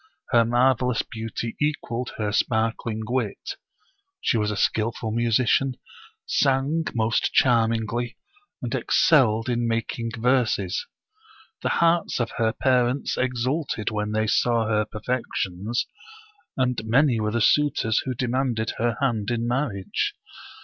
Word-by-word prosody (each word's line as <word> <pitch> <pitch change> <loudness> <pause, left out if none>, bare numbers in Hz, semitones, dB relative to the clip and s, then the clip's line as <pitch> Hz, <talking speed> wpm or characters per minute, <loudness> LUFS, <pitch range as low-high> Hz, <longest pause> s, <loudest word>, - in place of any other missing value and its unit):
Her 120 -2 +5
marvel 125 +1 +3
ous 120 - 0
beauty 115 +1 -5
equaled 125 -5 -2
her 105 -2 -1
sparkling 110 0 0
wit. 125 - -3 0.6
She - - +1
was 105 -2 +1
a 105 - -3
skillful 110 +1 0
musician, 120 +3 +2 0.5
sang 140 - +1
most 110 0 +1
charmingly, 115 -1 +2 0.5
and - - -3
excelled 115 -7 +3
in 120 -1 0
making 115 0 -2
verses. 120 -5 +1 0.7
The - - 0
hearts 170 -3 +2
of 120 -2 -1
her 115 -1 +2
parents 125 +1 +1
exulted 130 - -1
when 105 -1 -2
they 110 0 +1
saw 115 0 +2
her 105 -1 +1
perfections, 110 -2 -2 0.7
and 125 -4 0
many 120 +2 +3
were 105 0 0
the 115 +2 -1
suitors 115 -3 +3
who 130 -1 -3
demanded 125 -2 -1
her 115 0 0
hand 115 -6 0
in 120 -1 -1
marriage. 120 -6 -1
120 Hz, 125 wpm, -24 LUFS, 110-130 Hz, 0.7 s, Her